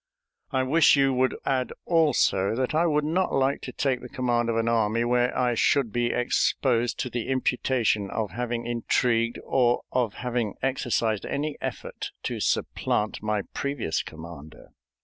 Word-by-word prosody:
I 130 - 0
wish 155 +6 +5
you 135 -1 +3
would 130 0 +1
add 130 -2 0
also 145 - +2
that 130 +3 -1
I 165 +3 +3
would 150 -2 +1
not 180 +5 0
like 135 +1 +1
to 125 - -6
take 130 0 -1
the - - -9
command 120 -3 0
of 115 - 0
an 115 0 0
army 115 0 +2
where 125 +1 +1
I 125 -1 +2
should 120 -1 +2
be 120 0 +1
exposed 120 0 +1
to 125 - -3
the 120 -2 -3
imputation 125 -5 0
of 105 -3 -3
having 120 +2 -3
intrigued 120 0 +1
or 120 -2 +2
of 120 -6 0
having 120 -4 -2
exercised 120 -5 0
any 145 +1 -2
effort - - -5
to - - -3
supplant 105 0 -1
my 105 -1 -1
previous 140 - -2
commander." 80 -1 -11
120 Hz, 160 wpm, -26 LUFS, 115-135 Hz, -, wish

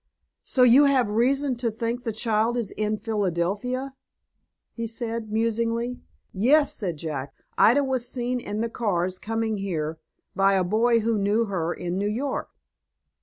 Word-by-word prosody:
"So 255 - +2
you 250 +4 +7
have 260 -6 +2
reason 260 +4 +2
to 240 -1 0
think 230 +2 -3
the 225 - 0
child 220 +2 0
is 230 -5 -1
in 215 0 -1
Phildelphia?" 210 +5 -2 0.8
he 230 -1 -4
said, 225 -1 -4
musingly. 230 +2 -1 0.3
"Yes," 285 +9 +3
said 180 - -3
Jack, 140 -4 -5 0.2
"Ida 270 +6 +5
was 260 -3 -1
seen 245 0 -2
in 210 -2 -4
the 230 - -1
cars, 185 -6 -1
coming 225 0 -2
here, 160 -5 -3 0.4
by 195 0 +4
a 190 - +2
boy 230 +5 +2
who 225 -1 0
knew 205 +3 +2
her 175 -5 -2
in 175 +1 -3
New 205 +1 0
York." 260 +6 -3
225 Hz, 155 wpm, -25 LUFS, 200-245 Hz, 0.8 s, you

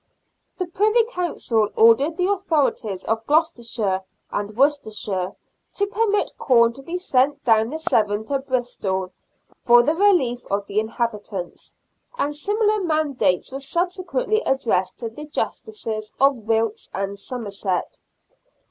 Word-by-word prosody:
The 365 - -1
Privy 425 +7 +3
Council 340 - -1
ordered 265 +8 +5
the 360 - +1
authorities 300 - 0
of 225 0 -1
Gloucestershire 235 - +1 0.3
and 205 +1 -4
Worcester 285 -2 +3
shire 195 -3 -2 0.4
to 405 - +2
permit 415 0 0
corn 235 -3 +4
to 270 - -11
be 335 +6 -4
sent 285 -4 +1
down 225 -1 +3
the 310 - -4
Severn 215 -8 +1
to 275 +3 -1
Bristol 240 -8 -2 0.5
for 240 0 +7
the 300 +5 +2
relief 325 -10 +2
of 200 0 -1
the 200 +1 0
inhabitants, 215 -5 -4 0.4
and 295 -9 -1
similar 420 +5 +1
mandates 305 - 0
were 270 - -5
subsequently 370 - -1
addressed 220 - 0
to 230 - -4
the 295 +7 -9
justices 230 - -4
of 275 +1 +5
Wilts 225 -1 -1
and 195 0 -3
Somerset. 200 -5 -4
255 Hz, 130 wpm, -22 LUFS, 215-335 Hz, 0.5 s, for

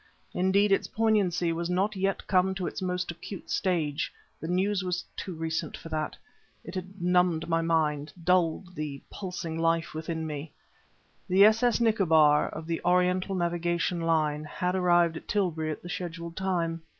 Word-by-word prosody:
Indeed, 195 +3 +3
its 195 - +2
poignancy 195 -6 +1
was 170 +1 -3
not 195 +4 +1
yet 195 0 -1
come 190 0 +2
to 190 -2 -3
its - - -4
most 180 -1 -2
acute 180 +2 -9
stage; 160 -6 0 0.3
the 160 - -5
news 190 +3 +1
was 180 -1 -2
too 185 -3 -5
recent 160 0 -3
for 165 - -10
that. 155 -1 -3 0.5
It 170 - -9
had 185 +1 -6
numbed 180 -2 +2
my 165 -1 +1
mind; 155 -3 0
dulled 180 0 +1
the 150 -4 -5
pulsing 175 -4 -5
life 165 0 +1
within 160 +1 -3
me. 150 0 -6 0.8
The 190 +2 +7
s.s._Nicobar_, 215 -10 +4
of 160 - -7
the 165 0 -2
Oriental 180 +2 +2
Navigation 175 0 0
Line, 155 -2 +1
had 180 +4 -2
arrived 175 -3 +3
at - - -11
Tilbury 170 -6 0
at 155 - -5
the - - -7
scheduled 170 -1 -5
time. 170 -3 -1
175 Hz, 160 wpm, -28 LUFS, 165-185 Hz, 0.8 s, The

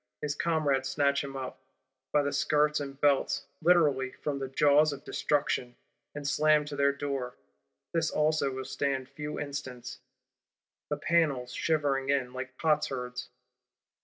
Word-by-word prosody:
His 145 -1 -2
comrades 145 -4 +1
snatch 140 -1 +2
him 135 -1 -6
up, 130 -1 -6 0.5
by 150 - +3
the 140 - -1
skirts 150 +1 +2
and 140 -1 -6
belts; 145 -2 +2 0.2
literally, 145 -7 +3
from 145 -2 -1
the 135 - -3
jaws 145 +3 +4
of 140 -1 -7
Destruction; 135 -4 -1 0.4
and 145 -1 -4
slam 150 0 +3
to 145 -1 -6
their 140 0 +3
Door. 140 -3 -4 0.6
This 165 -2 +1
also 155 -2 +1
will 130 0 -5
stand 135 -2 -2
few 150 0 -6
instants; 130 -4 -6 0.9
the 150 - -1
panels 145 -6 +1
shivering 140 -4 0
in, 130 -3 +1
like 130 0 -6
potsherds. 130 -5 -1
140 Hz, 140 wpm, -29 LUFS, 135-150 Hz, 0.9 s, jaws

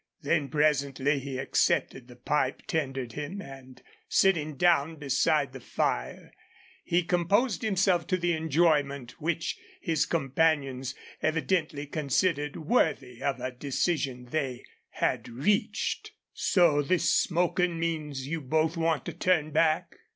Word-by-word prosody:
Then, 150 -5 +1
presently, 140 -1 +1
he 135 -1 -5
accepted 130 -1 0
the 125 - -13
pipe 135 +2 -1
tendered 135 -6 -2
him, 150 +8 -5
and, 135 -6 -11 0.3
sitting 155 -6 +2
down 165 -1 +3
beside 145 0 +1
the 135 - -7
fire, - - -2 0.5
he 175 +1 +1
composed 180 +7 +1
himself 190 -6 +1
to 185 - +1
the 175 -1 0
enjoyment 150 -5 +1
which 165 +1 -2 0.2
his 160 -2 0
companions 135 -3 0 0.3
evidently 155 -2 0
considered 150 +1 0
worthy 135 - 0
of 135 -3 -1
a 130 +1 -3
decision 135 0 -2
they 135 -5 -2 0.2
had - - -1
reached. 145 - -1 0.2
"So 170 -6 +3
this 170 +3 +2
smokin' 175 0 +1
means 155 -5 -3
you 160 +3 -3
both 155 +4 +1
want 165 -2 0
to - - -5
turn 160 -4 +1
back?" 155 0 +1
150 Hz, 125 wpm, -28 LUFS, 135-170 Hz, 0.5 s, down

